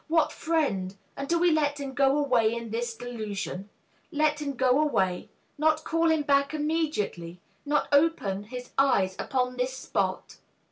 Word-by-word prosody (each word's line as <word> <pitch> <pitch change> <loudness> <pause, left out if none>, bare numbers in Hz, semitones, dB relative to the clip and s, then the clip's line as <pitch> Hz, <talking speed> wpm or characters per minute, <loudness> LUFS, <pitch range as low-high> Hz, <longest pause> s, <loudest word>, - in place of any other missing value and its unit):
What 320 -1 +2
friend! 235 - -1 0.2
and 275 - -5
do 340 - +3
we 350 0 +4
let 295 -2 +1
him 275 -1 -5
go 275 +1 +3
away 250 -7 +3
In 230 -2 -6
this 235 0 -2
delusion 215 -5 -5 0.4
let 300 -1 +1
him 285 -2 -2
go 260 +2 +3
away? 190 -12 0 0.3
Not 315 0 +2
call 330 0 +1
him 320 -2 +2
back 280 +1 +2
immediately, 295 - -2 0.3
not 295 +1 +1
open 285 -10 +2
His 250 +2 -8
eyes 195 -9 +3
upon 250 -1 -1
the 250 0 +1
spot? 260 0 -3
275 Hz, 155 wpm, -27 LUFS, 225-305 Hz, 0.4 s, we